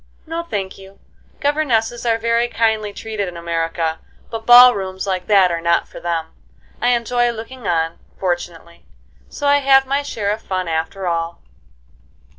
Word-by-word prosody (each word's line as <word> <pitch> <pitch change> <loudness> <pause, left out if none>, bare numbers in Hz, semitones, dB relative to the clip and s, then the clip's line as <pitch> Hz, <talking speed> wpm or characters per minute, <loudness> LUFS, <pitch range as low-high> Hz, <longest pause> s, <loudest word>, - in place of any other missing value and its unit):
"No, 330 +1 -3
thank 200 - -5
you. 195 0 -14 0.4
Governesses 245 -6 0
are 225 -1 +3
very 230 +1 +1
kindly 220 -3 0
treated 215 -1 -4
in 175 -1 -7
America; 165 -1 -2 0.3
but 225 -1 -6
ball 245 +1 +10
rooms 190 -2 -4
like 185 -2 -2
that 195 -4 +5
are 170 -1 -2
not 170 0 +1
for - - -11
them. 165 -2 -3 0.5
I 240 - +1
enjoy 240 +1 +1
looking 235 +1 -7
on, 165 -1 0 0.2
fortunately; 175 -2 -4 0.4
so 290 - -6
I 285 0 +5
have 270 -1 +5
my 275 +2 0
share 210 -7 -2
of 215 +1 -3
fun 185 -3 -3
after 165 +4 -3
all." 170 -1 -3
205 Hz, 160 wpm, -19 LUFS, 170-240 Hz, 0.5 s, ball